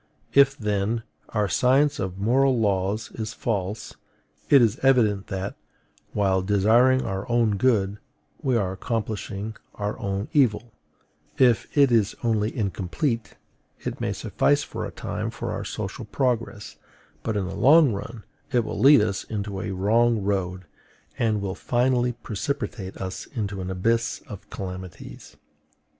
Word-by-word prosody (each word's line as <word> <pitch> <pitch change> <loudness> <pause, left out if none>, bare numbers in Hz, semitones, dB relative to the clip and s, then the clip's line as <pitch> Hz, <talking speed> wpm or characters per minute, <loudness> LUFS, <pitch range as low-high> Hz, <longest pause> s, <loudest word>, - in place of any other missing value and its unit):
If, 140 0 +5
then, 105 +1 -1 0.3
our 105 -2 0
science 135 +8 +3
of 95 -1 -3
moral 125 +5 +3
laws 100 +1 0
is 110 0 -5
false, 105 -1 -3 0.6
it 140 - +8
is 115 -1 +2
evident 110 -7 +3
that, 95 0 -4 0.6
while 95 -2 +2
desiring 110 +7 +4
our 95 +4 -4
own 115 -3 +2
good, 105 -4 +2 0.4
we 130 -5 +1
are 95 -4 0
accomplishing 105 0 -4 0.2
our 105 0 -3
own 100 +1 -2
evil; 120 -5 +2 0.6
if 125 -4 +4
it 140 -3 +6
is 110 -3 +2
only 110 -2 +1
incomplete, 110 - -2 0.5
it - - -5
may - - 0
suffice - - +1
for - - -5
a - - -9
time - - -4
for - - -5
our - - -3
social - - -5
progress, 120 -5 -2 0.4
but 110 -2 -2
in 100 - -1
the 90 - -5
long 145 -1 +6
run 110 +2 -7 0.3
it 120 -2 +2
will - - -4
lead 140 -2 +7
us 100 -2 -1
into 100 -3 -4
a - - -4
wrong 110 +3 +2
road, 95 -2 -2 0.5
and 110 -3 +1
will 95 -1 -2
finally 125 +2 +1
precipitate 115 -3 -4
us 95 -1 -5
into 100 -4 -3
an 90 - -4
abyss 115 +5 0
of 105 -5 -10
calamities. 90 -9 -8
110 Hz, 145 wpm, -25 LUFS, 100-120 Hz, 0.6 s, it